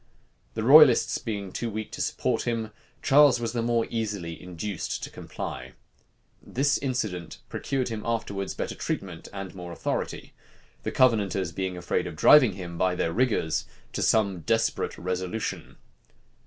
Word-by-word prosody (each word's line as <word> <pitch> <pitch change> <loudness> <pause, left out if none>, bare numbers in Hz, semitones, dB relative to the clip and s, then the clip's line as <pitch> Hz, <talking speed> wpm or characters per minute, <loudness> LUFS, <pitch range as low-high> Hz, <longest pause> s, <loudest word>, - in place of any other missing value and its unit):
The 110 - -2
royalists 135 -1 +7
being 100 -4 -4
too 120 - -3
weak 110 0 -5
to - - -5
support 125 -1 -1
him, 115 -2 -1 0.3
Charles 140 -2 +6
was 115 -1 -3
the 120 - 0
more 115 0 +1
easily 100 -8 -3
induced 90 +1 -4
to - - -6
comply. - - -7 0.7
This 140 +2 +1
incident 110 - -3
procured 130 -2 -2
him 110 -2 -4
afterwards 100 -4 -2
better - - -3
treatment - - -4
and 95 -2 -6
more 90 -2 -8
authority; - - -3 0.5
the - - -3
Covenanters 105 -8 +2
being 95 +1 -3
afraid 90 - -1
of - - -7
driving 125 - +7
him, 85 -3 -7
by 95 -1 +2
their 85 -2 -1
rigors, 115 -9 +1 0.3
to - - -2
some 100 -5 +2
desperate 80 - 0
resolution. 90 +4 -4
105 Hz, 145 wpm, -27 LUFS, 90-120 Hz, 0.7 s, royalists